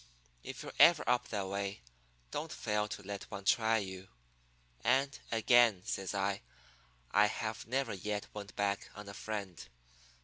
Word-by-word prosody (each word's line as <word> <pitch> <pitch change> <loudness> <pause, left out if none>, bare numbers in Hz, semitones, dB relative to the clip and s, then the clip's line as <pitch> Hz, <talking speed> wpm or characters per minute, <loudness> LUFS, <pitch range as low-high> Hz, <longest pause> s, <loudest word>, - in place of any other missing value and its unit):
If - - -7
you're - - -7
ever - - +8
up 125 0 +2
that 100 -3 -2
way, 100 +1 -3 0.5
don't - - -3
fail 105 0 -1
to 105 - -6
let 100 +1 -6
one 100 -2 -7
try 110 +1 +4
you. 95 -2 -5 0.8
And, 135 +1 +2
again,' 115 -4 +5
says 95 +1 -2
I, 100 0 0 0.7
'I 105 +1 +6
have 110 +1 -4
never 135 +1 0
yet 105 +2 -3
went 100 -1 -8
back 100 0 0
on 105 0 -9
a 100 - -7
friend. 100 -4 -5
105 Hz, 150 wpm, -34 LUFS, 100-110 Hz, 0.8 s, ever